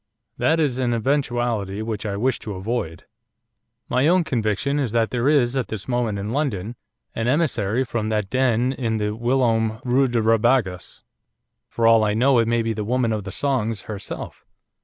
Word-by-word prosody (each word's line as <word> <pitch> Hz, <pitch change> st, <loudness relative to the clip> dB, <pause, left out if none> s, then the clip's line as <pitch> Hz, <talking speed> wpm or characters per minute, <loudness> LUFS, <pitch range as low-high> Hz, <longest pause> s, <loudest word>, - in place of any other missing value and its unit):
That 160 Hz, +1 st, +2 dB
is 135 Hz, -5 st, 0 dB
an 120 Hz, -2 st, +1 dB
eventuality 120 Hz, -5 st, -1 dB
which 110 Hz, -1 st, -4 dB
I 100 Hz, -1 st, -3 dB
wish 130 Hz, +5 st, 0 dB
to 105 Hz, -3 st, -6 dB
avoid. 95 Hz, -5 st, -4 dB, 0.8 s
My 130 Hz, +4 st, +2 dB
own 180 Hz, +1 st, +4 dB
conviction 125 Hz, -, -1 dB
is 125 Hz, -6 st, -2 dB
that 115 Hz, -1 st, +1 dB
there 125 Hz, +2 st, +1 dB
is 135 Hz, -4 st, +2 dB
at 130 Hz, -, -1 dB
this 110 Hz, -2 st, -6 dB
moment 120 Hz, -4 st, -1 dB
in 100 Hz, +2 st, -4 dB
London 120 Hz, -6 st, -2 dB, 0.4 s
an 115 Hz, -, -2 dB
emissary 130 Hz, -6 st, +1 dB
from 115 Hz, -3 st, -3 dB
that 105 Hz, -2 st, -1 dB
den 130 Hz, +1 st, +1 dB
in 115 Hz, -4 st, -2 dB
the 105 Hz, 0 st, -2 dB
whilom 115 Hz, -2 st, +1 dB
Rue 130 Hz, +2 st, +3 dB
de 120 Hz, -1 st, 0 dB
Rabagas 115 Hz, -4 st, +1 dB, 0.7 s
for 115 Hz, -, -1 dB
all 115 Hz, -1 st, +6 dB
I 105 Hz, -1 st, +1 dB
know 130 Hz, +2 st, +4 dB
it 115 Hz, -, +2 dB
may 115 Hz, 0 st, +1 dB
be 115 Hz, 0 st, -1 dB
the 105 Hz, 0 st, -4 dB
Woman 120 Hz, +1 st, 0 dB
of 105 Hz, -3 st, -4 dB
the 100 Hz, -, -5 dB
Songs 115 Hz, -6 st, -1 dB
herself. 105 Hz, -1 st, -7 dB
115 Hz, 180 wpm, -22 LUFS, 110-130 Hz, 0.8 s, all